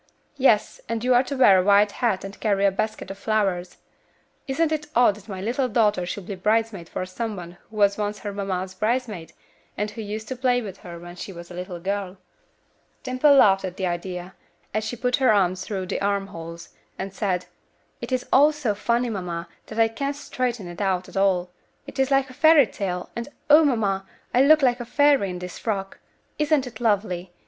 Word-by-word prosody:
"Yes, 225 -6 +3
and 230 0 -2
you 255 0 +3
are 245 - +6
to 275 +1 -5
wear 195 -7 +7
a - - +2
white 205 +1 +5
hat 225 -6 0
and 195 0 -8
carry 200 -2 +1
a 200 - +4
basket 195 -1 -3
of 195 - -9
flowers. 195 -5 -1 0.7
Isn't 310 +4 +1
it 305 -1 -2
odd 240 -3 +5
that 210 +1 -15
my 190 -2 -5
little 250 +5 0
daughter 210 -6 +2
should 190 +1 -5
be 200 - -5
bridesmaid 210 -2 0
for 185 - -3
some 215 +4 -4
one 175 -1 -9
who 220 - -14
was 200 -1 +3
once 210 0 -2
her 205 -1 -6
mamma's 190 -2 -3
bridesmaid, 215 -4 -2 0.4
and 210 +1 -2
who 225 - -7
used 215 +1 -5
to 260 - -3
play 250 -1 +2
with 200 -5 -7
her 175 -1 -10
when 175 +1 -10
she 195 - -6
was 175 -1 -10
a - - -8
little 180 0 -6
girl?" 195 +1 -3 0.9
Dimple 255 +3 +4
laughed 195 -7 +5
at 185 -1 -5
the 190 - -1
idea, 180 +1 -4 0.4
as 215 +1 0
she 220 +3 -4
put 250 +1 0
her 260 -4 +4
arms 185 -3 +2
through 190 -3 -4
the 185 - -3
arm 200 0 0
holes, 170 -2 -9 0.3
and 195 0 -5
said, 185 -3 -1 0.6
"It - - -6
is 255 -1 0
all 290 +3 +7
so 295 -8 -1
funny, 235 +3 0
mamma, 175 -4 -4 0.2
that 215 - -8
I 225 0 +5
can't 275 +5 -3
straighten 245 -7 -3
it 175 +3 -7
out 185 -2 0
at - - -15
all. 185 -2 +2 0.3
It - - -9
is 265 0 +2
like 270 -1 +2
a - - -12
fairy 315 0 +6
tale, 180 -5 -4
and, 235 +2 -4 0.2
O! 310 +2 +9
mamma, 205 -8 0 0.3
I 250 - +5
look 305 +2 +6
like 245 -1 +3
a - - -3
fairy 280 -4 +3
in 180 - -5
this 180 0 -7
frock. 195 -3 -3 0.4
Isn't 300 -3 +2
it 235 -3 -9
lovely? 195 -5 0
205 Hz, 210 wpm, -24 LUFS, 185-245 Hz, 0.9 s, O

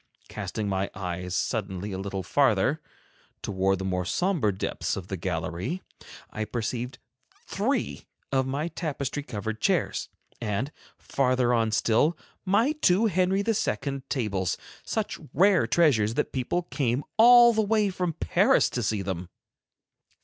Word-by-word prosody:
Casting 105 -2 -4
my 95 0 -1
eyes 90 -1 -4
suddenly 100 -3 -2
a 95 - -4
little 95 -1 -4
farther, - - +2 0.6
toward 95 -1 +1
the 95 - -5
more 90 -1 -1
somber 160 - +1
depths 95 - -2
of 95 -1 -7
the 95 - -2
gallery, 90 - -3 0.5
I 110 - -3
perceived 120 +2 -3 0.5
three - - -2 0.2
of 130 -1 +1
my 145 +5 -2
tapestry 145 -4 -3
covered 110 -4 -5
chairs; - - 0 0.3
and 115 +5 -2 0.3
farther 130 -2 +1
on 115 -2 +2
still, 115 +9 +2 0.3
my 215 +9 +3
two 225 -9 +3
Henry 190 0 +2
II. 140 - -1
tables, 100 - -1 0.3
such - - -3 0.2
rare 190 +3 +4
treasures 120 -10 +3
that - - -1
people 135 +7 -1
came 135 -5 -1
all 240 +1 +8
the 220 - +2
way 215 -1 +2
from 180 -2 -2
Paris 95 - +3
to - - -2
see 105 -3 -1
them. 90 -2 -4
120 Hz, 135 wpm, -27 LUFS, -, 0.6 s, all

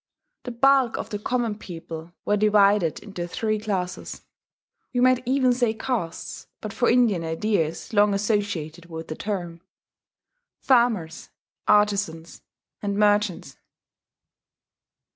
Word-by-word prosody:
The 250 - -4
bulk 265 0 +3
of - - -6
the 205 - -3
common 230 -1 -1
people 165 -2 -8
were 205 - +2
divided 205 -4 +3
into 180 -4 -6
three 215 +4 -1
classes 190 -4 -4 0.7
(we - - +2
might 255 0 +4
even 260 -1 +3
say 240 -3 +1
castes, 220 -8 -4
but 215 -2 -6
for 240 - +2
Indian 230 -8 +3
ideas 165 +3 -1
long 205 -1 +4
associated 195 -6 -2
with 160 -1 -8
the 155 - -4
term): 175 -5 -4 1.0
Farmers, 225 -10 +1 0.4
Artizans, 200 -6 +1 0.4
and 200 -1 -2
Merchants. 205 -9 +1
205 Hz, 115 wpm, -24 LUFS, 175-225 Hz, 1.0 s, might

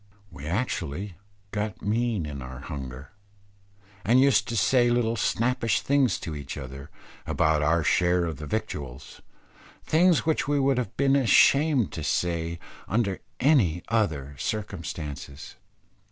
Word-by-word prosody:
We 70 +2 -9
actually 90 - -3 0.4
got 105 -1 -4
mean 110 -3 0
in 70 -2 -6
our 65 +1 -8
hunger, 70 -2 -7 0.9
and 120 +5 +4
used 135 -3 +4
to 115 - -2
say 120 +4 +3
little 120 -1 +1
snappish 115 -2 +1
things 140 -6 +2
to 80 - -5
each 70 -1 -6
other, 70 +1 -8 0.4
about 80 -1 +2
our 80 +2 +2
share 90 +2 +2
of 80 -4 -4
the 75 - -7
victuals; 70 - -5 0.6
things 170 +1 +3
which 160 -3 +1
we 145 0 +2
would 135 -1 +2
have 120 -6 -5
been 140 0 +3
ashamed 135 - +4
to 80 - -5
say 85 +2 -1 0.3
under 105 -3 0 0.2
any 115 - +3
other 80 -11 0
circumstances. 80 -9 -5
95 Hz, 135 wpm, -26 LUFS, 75-120 Hz, 0.9 s, and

